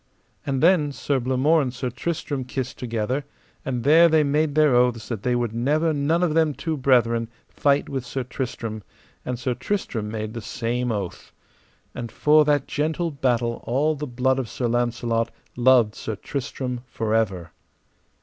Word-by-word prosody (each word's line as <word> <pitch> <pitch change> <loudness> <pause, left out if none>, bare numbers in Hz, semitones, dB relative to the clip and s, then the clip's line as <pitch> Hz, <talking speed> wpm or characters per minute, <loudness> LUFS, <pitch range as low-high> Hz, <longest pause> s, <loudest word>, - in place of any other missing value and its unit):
And 135 -1 0
then 165 -4 +4
Sir 140 0 -1
Blamore 130 +6 +2
and 130 -3 -2
Sir 125 0 -4
Tristram 145 0 -3
kissed 130 0 -5
together, 120 +3 -2 0.4
and 125 -3 -3
there 165 +4 +6
they 160 -1 +4
made 150 +1 +1
their 155 -3 +5
oaths 120 -2 +2
that 115 -5 -3
they 125 +2 +1
would 120 -2 -1
never 150 +7 +1
none 155 +4 +1
of 165 -4 +1
them 160 -3 +2
two 160 -1 -2
brethren 120 -4 +2 0.2
fight 140 0 +1
with 135 -2 -3
Sir 125 +1 -4
Tristram, 120 -3 -5 0.4
and 125 - -3
Sir 125 +1 -1
Tristram 120 - -3
made 110 0 -4
the 115 - -5
same 120 +3 -2
oath. 100 -5 -5 0.6
And 120 -2 -6
for 150 +1 +4
that 145 -1 +2
gentle 160 +3 -1
battle 120 -4 0
all 145 +6 +2
the 150 0 -5
blood 130 +1 +1
of 125 -4 -4
Sir 120 +3 -2
Launcelot 120 -1 0 0.3
loved 120 -3 +4
Sir 110 - -5
Tristram 125 +1 -4
for 110 -2 -2
ever. 95 -7 0
125 Hz, 170 wpm, -24 LUFS, 115-145 Hz, 0.6 s, there